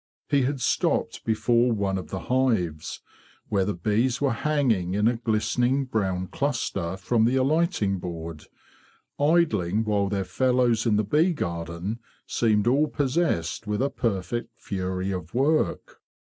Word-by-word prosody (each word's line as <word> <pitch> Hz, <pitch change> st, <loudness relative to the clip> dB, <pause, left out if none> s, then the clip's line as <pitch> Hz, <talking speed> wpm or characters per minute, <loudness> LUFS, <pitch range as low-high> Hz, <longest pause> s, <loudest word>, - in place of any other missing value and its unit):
He 140 Hz, -, +3 dB
had 135 Hz, +2 st, -1 dB
stopped -, -, 0 dB
before 115 Hz, +2 st, +2 dB
one 100 Hz, -3 st, 0 dB
of -, -, -9 dB
the 95 Hz, -, -4 dB
hives, 100 Hz, -9 st, 0 dB, 0.5 s
where 100 Hz, -2 st, +1 dB
the 105 Hz, -, -2 dB
bees 110 Hz, +8 st, +1 dB
were 140 Hz, -3 st, +1 dB
hanging 115 Hz, -11 st, 0 dB
in 105 Hz, +2 st, +3 dB
a 120 Hz, 0 st, +1 dB
glistening 120 Hz, +4 st, +1 dB
brown 95 Hz, -7 st, -1 dB
cluster 100 Hz, -8 st, -2 dB
from 110 Hz, +4 st, +1 dB
the 125 Hz, +3 st, +2 dB
alighting 135 Hz, -, +1 dB
board; 85 Hz, -3 st, -7 dB, 0.7 s
idling 115 Hz, -, +2 dB
while 100 Hz, -2 st, +1 dB
their 100 Hz, -1 st, -1 dB
fellows 120 Hz, +2 st, +2 dB
in 110 Hz, -, +3 dB
the 105 Hz, -, +2 dB
bee 155 Hz, -, +2 dB
garden 85 Hz, -, -4 dB, 0.3 s
seemed 105 Hz, -3 st, +1 dB
all 140 Hz, +6 st, +3 dB
possessed 130 Hz, -, -1 dB
with 105 Hz, 0 st, -1 dB
a 140 Hz, -, 0 dB
perfect 115 Hz, 0 st, -3 dB
fury 95 Hz, -1 st, -3 dB
of 90 Hz, +2 st, -6 dB
work. 150 Hz, +5 st, 0 dB
110 Hz, 145 wpm, -25 LUFS, 95-130 Hz, 0.7 s, He